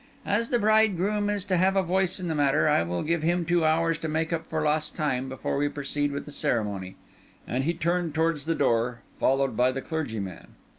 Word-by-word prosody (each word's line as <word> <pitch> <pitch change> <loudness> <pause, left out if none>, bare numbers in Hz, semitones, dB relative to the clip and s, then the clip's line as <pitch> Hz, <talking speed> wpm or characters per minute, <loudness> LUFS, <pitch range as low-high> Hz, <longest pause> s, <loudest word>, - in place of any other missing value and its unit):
As 230 +3 0
the 240 - +2
bridegroom 210 -2 +2
is 205 -2 -1
to 185 -3 +1
have 190 +2 +3
a 195 - +3
voice 185 +1 +1
in 180 - -4
the 160 - -1
matter, 145 -1 +2
I 150 - +4
will 85 +1 -2
give 165 +1 0
him 170 +2 +1
two 175 -1 +2
hours 165 0 +2
to 165 - -3
make 160 +2 -1
up 165 - -3
for 155 -1 -2
lost 150 0 0
time 135 -4 -1
before 130 +1 -3
we 145 +1 +1
proceed 145 0 -2
with 140 - -4
the 150 - -9
ceremony." 100 -8 -2 0.5
And 130 +2 -1
he 170 +2 0
turned 170 -2 -1
towards 160 -2 +1
the 165 0 0
door, 120 -1 +1 0.2
followed 135 -2 +2
by 125 +3 +3
the 135 +1 -4
clergyman. 110 - -5
155 Hz, 215 wpm, -26 LUFS, 135-175 Hz, 0.5 s, I